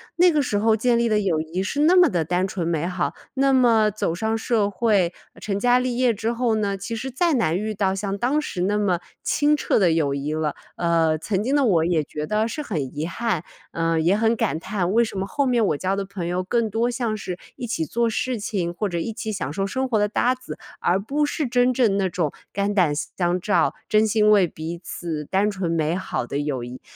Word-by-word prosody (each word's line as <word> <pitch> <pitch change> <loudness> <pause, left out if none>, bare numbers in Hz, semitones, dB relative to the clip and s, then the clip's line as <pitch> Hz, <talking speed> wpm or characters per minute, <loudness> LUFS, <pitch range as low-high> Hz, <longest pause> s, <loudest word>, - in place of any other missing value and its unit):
那 355 0 +5
个 300 -2 +2
时 215 -6 -1
候 220 +1 +3
建 235 +2 +2
立 235 0 +2
的 215 -1 +2
友 180 -6 +1
谊 165 +4 -3
是 280 +10 -1
那 340 +4 +5
么 360 -3 +6
的 170 -4 0
单 180 +3 0
纯 180 -3 -3
美 165 0 0
好。 180 -1 -2 0.2
那 270 0 +3
么 225 -4 +4
走 170 -5 -2
上 220 +3 -1
社 220 -3 +1
会， 195 -4 +2 0.3
成 200 -1 -2
家 245 +2 +4
立 250 -1 -1
业 250 -2 +3
之 225 +2 -2
后 235 -2 +1
呢， 200 -2 0
其 215 +4 -5
实 255 +4 -5
再 335 +5 +1
难 170 -9 +1
遇 215 +2 -2
到 190 -1 +1
像 200 0 -3
当 270 +7 +1
时 180 -11 -4
那 205 +2 +1
么 185 -4 +1 0.2
清 295 +1 +2
澈 - - +1
的 180 -5 +4
友 145 -4 +1
谊 145 +2 -3
了。 155 -1 -1 0.2
呃， 165 -2 +2
曾 200 +3 -1
经 270 +4 +1
的 285 - +3
我 165 -7 +3
也 165 -3 +1
觉 150 +1 -5
得 215 +4 0
是 300 +5 -4
很 150 - -4
遗 155 - -1
憾， 180 -1 -2 0.3
呃， 165 -1 0
也 185 +5 +3
很 225 +1 +2
感 210 -8 -1
叹， 185 -1 -2
为 235 +1 +5
什 210 -3 -5
么 195 - -2
后 280 +4 0
面 240 -3 +2
我 150 - 0
交 190 +3 -1
的 200 - -2
朋 190 -3 -6
友 180 +1 -1
更 225 +1 0
多 235 +2 +1
像 235 -3 -2
是 185 -3 -5 0.2
一 245 - -6
起 160 -8 -1
做 235 +7 0
事 245 +1 -2
情， 185 -5 -2
或 205 +2 -2
者 170 - -3
一 215 +7 -3
起 220 0 -4
享 145 -8 -4
受 195 +2 -1
生 260 +4 -1
活 220 -4 +1
的 210 - +2
搭 245 +4 +1
子， 255 -1 -9 0.2
而 185 +2 +2
不 285 +9 -1
是 300 -2 -2
真 245 +1 +3
正 225 -6 +2
那 190 -2 +1
种 165 -4 -1 0.2
肝 200 +1 -1
胆 175 -7 +3
相 175 +3 -1
照， 205 +3 +1
真 215 0 +3
心 215 0 +3
为 195 -4 +5
彼 160 +2 -6
此 165 -4 -5
单 200 +5 +1
纯 190 -4 -3
美 160 0 0
好 190 - -3
的 140 - -3
友 140 -4 -2
谊。 125 +1 -8
205 Hz, 260 characters per minute, -23 LUFS, 175-235 Hz, 0.3 s, 么